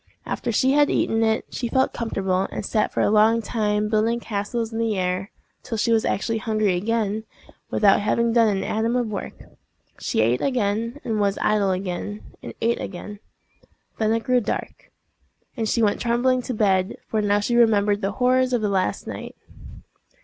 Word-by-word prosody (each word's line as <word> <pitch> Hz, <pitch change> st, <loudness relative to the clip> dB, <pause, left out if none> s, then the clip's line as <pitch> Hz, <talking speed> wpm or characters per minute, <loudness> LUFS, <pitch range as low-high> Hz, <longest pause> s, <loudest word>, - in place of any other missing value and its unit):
After 240 Hz, -, -3 dB
she 260 Hz, +4 st, +2 dB
had 290 Hz, +1 st, +4 dB
eaten 225 Hz, 0 st, +1 dB
it, 220 Hz, 0 st, +1 dB
she 240 Hz, -, -3 dB
felt 260 Hz, +2 st, +1 dB
comfortable, 195 Hz, -5 st, -1 dB
and -, -, -4 dB
sat 215 Hz, -, 0 dB
for -, -, -1 dB
a -, -, +2 dB
long 220 Hz, +2 st, +4 dB
time 210 Hz, -1 st, -1 dB
building 220 Hz, +2 st, +1 dB
castles 225 Hz, +1 st, -3 dB
in 225 Hz, -, -3 dB
the 225 Hz, -3 st, 0 dB
air—till 185 Hz, +5 st, -4 dB
she 230 Hz, +2 st, +1 dB
was 225 Hz, -1 st, +3 dB
actually 225 Hz, +2 st, -1 dB
hungry 215 Hz, -4 st, +1 dB
again, 215 Hz, +2 st, -1 dB, 0.5 s
without 200 Hz, -2 st, +4 dB
having 230 Hz, +3 st, +1 dB
done 230 Hz, -1 st, +5 dB
an 195 Hz, -2 st, 0 dB
atom 225 Hz, +4 st, 0 dB
of 240 Hz, -3 st, 0 dB
work. 200 Hz, -, -5 dB, 0.6 s
She -, -, 0 dB
ate 115 Hz, +3 st, +2 dB
again, 230 Hz, 0 st, -1 dB
and 220 Hz, -3 st, -1 dB
was 200 Hz, -1 st, +1 dB
idle 210 Hz, -2 st, +2 dB
again, 190 Hz, +2 st, -4 dB
and -, -, -8 dB
ate 235 Hz, +1 st, +1 dB
again. 205 Hz, +2 st, -7 dB, 0.8 s
Then 220 Hz, -1 st, +2 dB
it 225 Hz, 0 st, 0 dB
grew 250 Hz, +2 st, +2 dB
dark, -, -, -5 dB, 0.6 s
and 225 Hz, -4 st, -2 dB
she 230 Hz, -, +1 dB
went 205 Hz, -1 st, +1 dB
trembling 250 Hz, +2 st, +2 dB
to 250 Hz, -, -4 dB
bed, 195 Hz, -2 st, +1 dB
for 220 Hz, -, 0 dB
now 205 Hz, 0 st, +2 dB
she 235 Hz, +4 st, -1 dB
remembered 210 Hz, -3 st, +3 dB
the 195 Hz, +1 st, -1 dB
horrors 255 Hz, +1 st, +2 dB
of 235 Hz, -3 st, +1 dB
the 210 Hz, -, +1 dB
last 190 Hz, -2 st, -1 dB
night. -, -, -7 dB
220 Hz, 180 wpm, -23 LUFS, 205-235 Hz, 0.8 s, done